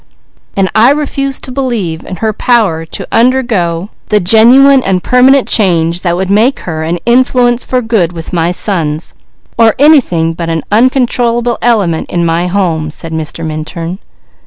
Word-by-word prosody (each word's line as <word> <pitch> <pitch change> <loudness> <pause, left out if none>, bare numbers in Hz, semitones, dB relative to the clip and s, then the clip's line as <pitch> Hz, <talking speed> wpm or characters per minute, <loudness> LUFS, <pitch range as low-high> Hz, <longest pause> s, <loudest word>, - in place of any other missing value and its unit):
"And 195 -1 +1
I 225 +3 +4
refuse 275 -2 -1
to 255 - -6
believe 235 -12 -3
in 185 - -7
her 220 +4 -2
power 210 -9 0
to - - -7
undergo 225 -8 0 0.2
the 210 - +2
genuine 250 +8 +5
and 190 -5 -1
permanent 255 +2 +3
change 170 -4 +1
that 175 -2 -1
would 190 +1 -2
make 225 +7 +2
her 160 -3 -5
an 165 +2 -2
influence 245 0 +2
for 255 -1 -2
good 215 -7 0
with 165 -2 -8
her 170 -1 -1
sons, 165 -5 -3 0.5
or 225 -2 +4
anything 245 - +3
but 165 0 -5
an 165 -1 -2
uncontrollable 240 0 +1
element 200 -9 0
in 170 -1 -1
my 170 +2 0
home," 175 -5 -1
said 160 +1 -8
Mr. 160 +1 -5
Minturn. 165 +3 -6
200 Hz, 160 wpm, -10 LUFS, 170-245 Hz, 0.5 s, genuine